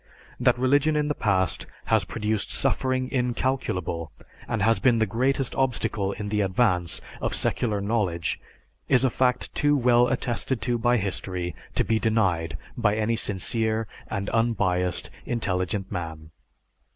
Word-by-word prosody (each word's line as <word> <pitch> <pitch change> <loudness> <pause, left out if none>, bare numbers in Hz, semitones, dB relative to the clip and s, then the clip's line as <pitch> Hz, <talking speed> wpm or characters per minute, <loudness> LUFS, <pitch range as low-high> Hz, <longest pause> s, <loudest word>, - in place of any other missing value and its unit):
That 125 -1 +3
religion 145 +5 +3
in 150 0 +1
the - - +2
past 95 -8 0 0.2
has - - +2
produced 105 -1 -2
suffering 130 0 0
incalculable 120 - -1 0.4
and 110 -3 -1
has 110 -1 +3
been 120 +3 +4
the 110 - +3
greatest 130 +5 0
obstacle 110 -6 0
in 105 0 -5
the 105 0 +1
advance 95 -3 +1 0.2
of - - -1
secular 110 -4 +1
knowledge 100 -7 -1 0.5
is 130 0 +4
a 130 - +3
fact 125 0 +1
too 145 0 +3
well 120 -1 +4
attested 125 -1 -1
to 120 -1 0
by 120 +2 +3
history 90 -3 -3 0.2
to - - +3
be 110 -1 +1
denied 90 -9 +1 0.2
by 105 -4 +2
any 110 +1 +1
sincere 110 +2 0 0.2
and 100 -2 -3
unbiased 95 -6 0 0.2
intelligent 95 -4 -1
man. 80 -3 -5
110 Hz, 140 wpm, -26 LUFS, 95-125 Hz, 0.5 s, been